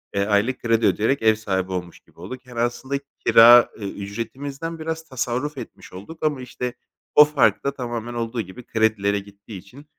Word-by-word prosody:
eee, 100 - +1
aylık 105 +5 +1
kredi 115 -1 +2
ödeyerek 115 +6 +1
ev 110 -1 +4
sahibi 95 -3 -2
olmuş 90 -2 -5
gibi - - -26
olduk. 125 +9 -9
Yani, 125 -2 -8
aslında 130 +3 -1 0.3
kira 120 +1 +8
ücretimizden 120 +11 -6
biraz 160 0 -4
tasarruf 130 +1 -3
etmiş 125 - -10
olduk 105 - -10
ama, 150 -4 0
işte, 125 0 -5 0.4
o 150 - +9
fark 150 -3 +2
da, 140 - +1
tamamen, 120 -2 -5
olduğu 115 0 -3
gibi 95 +5 -11
kredilere 105 -3 +1
gittiği 100 +1 -12
için, 125 +10 -15
120 Hz, 170 wpm, -22 LUFS, 100-130 Hz, 0.4 s, o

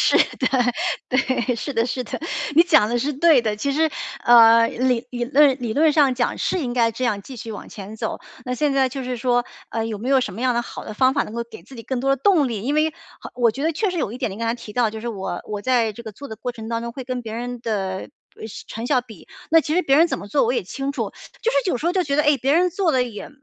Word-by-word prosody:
是 - - +4 0.2
的， 255 - +1 0.6
对。 255 -1 0
是 280 +5 -4
的 230 0 +2
是 255 0 -3
的。 235 - -6 0.3
你 330 - +8
讲 275 -11 +4
的 240 - 0
是 290 +5 -1
对 290 -3 +4
的。 215 -2 -1
其 280 +5 -1
实， 315 +2 +2 0.3
呃， 230 -1 +7
理 250 -1 0
理 240 -1 -2
论 275 +1 +4
理 230 -3 -2
论 305 +4 +4
上 285 -4 +4
讲 245 -1 -1
是 370 - 0
应 245 -4 -2
该 230 -2 +2
这 255 +3 -3
样 210 -5 0
继 265 - -10
续 225 0 -7
往 210 - -8
前 205 +1 -9
走， - - -3 0.3
那 250 - -2
现 290 +2 +1
在 270 -1 +3
就 265 +1 -5
是 250 0 -3
说， 245 0 +1 0.3
呃， 225 -1 -2
有 215 -2 -4
没 240 +5 -4
有 270 -1 +4
什 - - -3
么 225 - -7
样 255 -1 +2
的 240 - +1
好 - - -8
的 215 - -7
方 260 +3 +3
法 - - +1
能 215 - -9
够 235 - -2
给 235 - -13
自 270 - -14
己 230 - -8
更 260 +1 -3
多 270 +1 +2
的 - - -9
动 345 -9 +4
力？ 220 -4 -4
因 280 +5 -1
为 310 +1 +2 0.3
好 - - -9
我 240 -2 +3
觉 270 +6 -5
得 325 - +2
确 405 +5 0
实 360 - -3
有 215 - -2
一 250 - -7
点， 250 - -1
你 195 - -8
刚 230 - -2
才 230 - +1
提 230 -3 -10
到， 240 -2 +2
就 220 0 -7
是 235 - -4
我 190 -5 -4
我 210 -1 -4
在 235 -2 +1
这 235 - -10
个 220 - -7
做 280 +7 -10
的 220 - -7
过 245 +3 -4
程 225 -1 -8
当 230 0 -1
中 235 0 -5
会 265 - -6
跟 250 -1 -4
别 220 -2 -7
人 245 0 -5
的， 225 -2 -2 0.6
不 - - -20
呃， 220 - -5 0.2
成 230 +2 -5
效 260 -3 +3
比， 225 -6 -14 0.2
那 325 0 +7
其 305 +1 -2
实 360 - +3
别 275 -1 +3
人 330 +2 +6
怎 - - -3
么 - - -8
做 280 +3 +2
我 235 - +1
也 250 - 0
清 270 +9 -4
楚。 - - -3 0.3
就 465 - +2
是 - - +1
有 - - 0
时 295 - -8
候 350 - +2
就 375 - +2
觉 280 - -1
得， 300 - +4
诶， 295 -1 +4
别 270 +3 +1
人 355 +3 +3
做 365 -1 +1
的 255 - +3
也 235 -4 -6
250 Hz, 325 characters per minute, -22 LUFS, 230-280 Hz, 0.6 s, 你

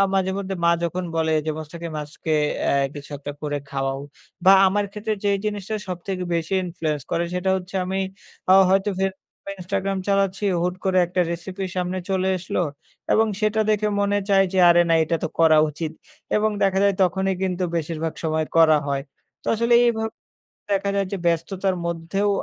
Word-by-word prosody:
মাঝে 190 -1 +2
মধ্যে 195 -1 -3
মা 170 - +5
যখন 180 +2 -2
বলে 160 -1 +1
যে, - - +1
‘’মুস্তাকিম 165 +2 -7
আজকে 150 +2 -5 0.4
এ - - +3 0.2
কিছু 145 0 -9
একটা 145 +1 -6
করে 145 -1 -2
খাওয়াও‘’ 135 0 -2 0.4
বা 190 - +8
আমার 205 +2 +1
ক্ষেত্রে 215 +1 -2
যেই 200 -1 +3
জিনিসটা 210 0 -3
সবথেকে 180 +1 -4
বেশি 165 +2 -1
influence 155 -5 -3
করে 170 - +1
সেটা 180 +1 0
হচ্ছে 185 +1 -8
আমি 190 +1 -2 0.5
আ - - +9 0.2
হয়তো 195 +2 +3
Facebook 190 0 -1 0.4
Instagram 195 +1 -2
চালাচ্ছি, 195 0 +1 0.2
হুট 180 +1 0
করে 190 -1 +2
একটা 180 +1 -1
recipe 185 +3 -4
সামনে 180 +1 -1
চলে 190 0 +1
এসলো 180 - -2 0.5
এবং 220 +1 +4
সেটা 215 0 +1
দেখে 210 0 +2
মনে 200 0 +2
চায় 195 -1 +5
যে, 190 - 0
আরে 175 0 +6
না 165 - +4
এটা 165 +1 0
তো - - 0
করা 160 -1 +6
উচিত 155 +1 -5 0.4
এবং 215 +1 +2
দেখা 195 -1 +2
যায় 200 -1 +3
তখনই 190 +1 +1
কিন্তু 185 -1 0
বেশিরভাগ 160 0 -2
সময় 155 0 0
করা 160 -1 +7
হয়। 140 -1 -1 0.4
তো - - -20
আসলে 235 +2 +2
এইভাব 220 -2 0 0.7
দেখা 200 0 0
যায় 200 0 +1
যে, 200 - -2
ব্যস্ততার 180 +3 0
মধ্যেও 170 +4 -1
185 Hz, 175 wpm, -23 LUFS, 165-195 Hz, 0.7 s, আ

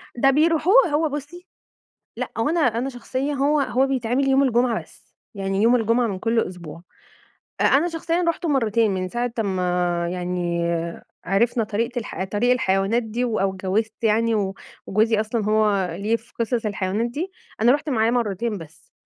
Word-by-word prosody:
ده 270 +3 +4
بيروحوه 330 - +4
هو 305 +1 +1
بُصّي، 295 +6 -7 0.7
لأ - - -4
هو 225 - +1
أنا 335 +1 +1
أنا 245 -1 +1
شخصيًا 265 +3 -3
هو 285 +2 +2
هو 265 0 +1
بيتعمل 265 +1 0
يوم 270 +1 +4
الجمعة 245 -2 +1
بس، - - -22 0.2
يعني 195 +1 -1
يوم 240 +2 +5
الجمعة 230 +1 +2
من 195 -3 -3
كل 225 +2 +1
أسبوع. 170 -4 -7 0.8
أ - - +2
أنا 295 +6 +4
شخصيًا 335 +1 -1
رُحتُه 335 0 -1
مرتين 230 -5 +2
من 185 -1 -2
ساعة 240 +3 -2
أمّا 180 -3 0
يعني 175 -1 -2 0.6
عرفنا 225 +4 +1
طريقة 230 +4 -2
الح 190 -5 -4
طريق 205 +6 0
الحيوانات 195 0 +1
دي 225 +2 -2
و 225 -3 -1
أو 195 0 0
اجوّزت 215 +4 -2
يعني 225 +1 +2
و 195 -2 -1 0.3
وجوزي 215 +2 +2
أصلًا 220 0 -2
هو 210 -3 +2
ليه 215 +3 +1
في 230 +1 -22
قصص 230 0 0
الحيوانات 205 +2 -1
دي، 335 +9 -4 0.3
أنا 240 +3 +5
رُحت 295 +2 -1
معاه 225 -2 +2
مرتين 230 -2 -1
بس، 160 -2 -14
230 Hz, 170 wpm, -23 LUFS, 195-260 Hz, 0.8 s, يوم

